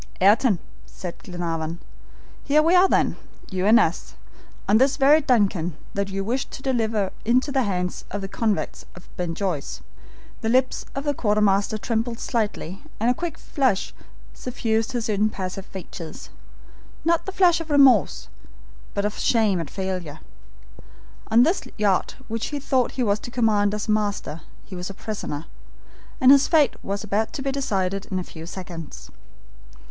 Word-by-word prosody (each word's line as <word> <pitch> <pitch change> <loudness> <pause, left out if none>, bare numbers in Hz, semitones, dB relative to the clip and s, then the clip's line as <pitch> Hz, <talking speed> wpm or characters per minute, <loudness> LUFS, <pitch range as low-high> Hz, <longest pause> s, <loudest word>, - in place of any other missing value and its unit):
"Ayrton," 205 +2 +5 0.3
said 180 -2 -8
Glenarvan, 170 -2 -4 0.6
"here 300 +2 +4
we 330 +3 +3
are 365 +1 +7
then, - - +2 0.3
you 190 +1 0
and 225 +3 +7
us, 170 -6 -1 0.5
on 210 +2 +5
this 265 +1 +3
very 295 +3 +6
DUNCAN 195 - +1 0.2
that 200 0 -1
you 195 0 -2
wished 245 +6 -2
to 265 - -9
deliver 220 -6 0
into 255 +5 +2
the 270 -1 +2
hands 180 -5 -2
of 205 - -4
the 195 - -4
convicts 215 +1 -1
of 180 - -15
Ben 175 -2 -3
Joyce." 180 -8 -3 0.6
The 225 - -1
lips 255 +2 +1
of 275 - -2
the 290 -1 0
quartermaster 210 -3 +2
trembled 230 +1 -2
slightly 210 -7 -2 0.2
and 230 +3 +3
a - - +3
quick 345 +5 -4
flush 260 -9 0 0.4
suffused 225 -2 -1
his 235 -3 -1
impassive 195 -3 -1
features. 175 -3 -9 0.7
Not 335 +2 +2
the - - -2
flush 360 -3 +4
of 325 - -8
remorse, 270 - +4 0.7
but 200 - 0
of 210 - -3
shame 215 -6 +2
at 165 -4 -4
failure. 185 -6 -4 1.1
On 230 +2 +6
this 340 +8 +2 0.2
yacht 205 -3 +1
which 225 0 -3
he 290 - -3
thought 260 -3 +1
he 260 - -1
was 205 -2 +1
to - - -8
command 215 -4 +2
as 210 - -4
master, 205 -7 -1 0.2
he 190 - -9
was 180 +1 -5
a 195 - -8
prisoner, 170 -9 -5 0.7
and 260 +1 +7
his 280 0 +6
fate 310 -4 +4
was 200 +1 -3
about 215 +1 -1
to 270 - -4
be 275 - 0
decided 195 -8 -1
in 185 - -2
a 185 - -1
few 165 -1 -10
seconds. 175 -3 -8
215 Hz, 165 wpm, -24 LUFS, 190-255 Hz, 1.1 s, are